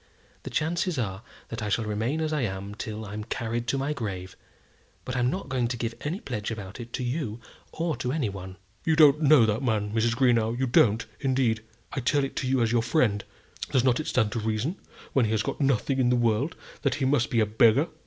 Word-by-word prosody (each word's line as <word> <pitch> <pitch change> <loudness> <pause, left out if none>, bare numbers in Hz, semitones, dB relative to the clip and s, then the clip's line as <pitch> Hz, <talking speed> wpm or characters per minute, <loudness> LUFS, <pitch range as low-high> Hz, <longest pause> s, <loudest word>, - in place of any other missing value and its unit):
The - - -7
chances 170 +1 0
are 100 -5 -2 0.3
that 115 - -5
I 105 - -2
shall 110 +2 0
remain 110 +9 -1
as 155 -1 -1
I 150 - 0
am 100 -2 -3
till 110 0 -5
I'm 105 +1 -5
carried 115 +1 -3
to 135 - +1
my 140 +3 -1
grave; 95 -8 -5 0.7
but 130 - -4
I'm 125 -1 +2
not 185 +2 -3
going 130 -3 0
to 120 0 -3
give 115 0 -2
any 165 +7 -3
pledge 110 - -4
about 105 -1 -6
it 120 0 -8
to - - -2
you 120 -3 -2 0.3
or 165 -1 -1
to 125 0 -2
any 145 -5 0
one." 95 -1 -7 0.3
"You 160 - +2
don't 150 -1 +6
know 145 -5 +6
that 110 +3 0
man, 105 -5 0
Mrs. 115 +1 +2
Greenow; 120 -3 +2
you 130 - +1
don't, 115 -3 +3
indeed. 130 -5 +1 0.3
I - - -1
tell 140 +3 +2
it 135 - -3
you 130 -2 +2
as 115 - +1
your 120 -1 +3
friend. 115 -6 +1 0.5
Does 130 - +2
not 125 -2 +3
it 155 - -4
stand 125 -9 +1
to 115 - -2
reason, 110 - -1 0.4
when 130 -4 +4
he 110 - -1
has 110 -1 +1
got - - -3
nothing 135 0 +1
in 125 -2 +3
the 125 - +4
world, 120 +5 +1 0.3
that - - +1
he 140 - -1
must 130 -3 +2
be 115 - +1
a 110 - +4
beggar? 115 +7 +4
120 Hz, 230 wpm, -27 LUFS, 110-135 Hz, 0.7 s, don't